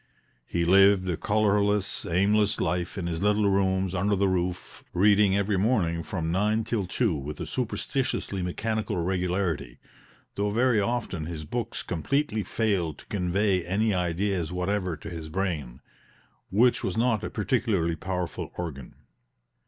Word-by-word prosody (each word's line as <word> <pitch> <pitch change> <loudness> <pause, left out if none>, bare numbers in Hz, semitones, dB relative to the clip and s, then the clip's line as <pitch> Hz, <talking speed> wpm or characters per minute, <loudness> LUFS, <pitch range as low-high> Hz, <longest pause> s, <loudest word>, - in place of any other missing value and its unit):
He 85 -1 0
lived 95 +1 +5
a 90 - 0
colorless, 105 0 +1
aimless 100 +4 +2
life 90 +3 -1
in 95 - -3
his 85 -1 -3
little 105 0 +3
rooms 95 -1 +1
under 100 +3 +1
the 100 0 +2
roof, 90 -1 -2
reading 100 +1 +4
every 100 0 +1
morning 95 -6 +1
from 80 0 -3
nine 105 +5 +1
till 105 -4 -2
two 110 +1 +1
with 75 0 -5
a - - -3
superstitiously 125 -4 -2
mechanical 110 +3 -2
regularity, 90 -6 -1 0.6
though 100 +1 -1
very 120 +1 +3
often 100 -7 -2
his 80 -3 -6
books 120 +7 -4
completely 110 - -1
failed 95 -7 -1
to - - -15
convey 95 0 0
any 105 +5 +1
ideas 90 -1 -1
whatever 90 -1 -1
to - - -10
his 80 -2 -6
brain, 80 -9 -3 0.7
which 120 +5 +3
was - - -2
not 115 -2 +2
a - - -3
particularly 105 -6 0
powerful 90 +1 -4
organ. 75 -7 -6
95 Hz, 145 wpm, -27 LUFS, 85-105 Hz, 0.7 s, lived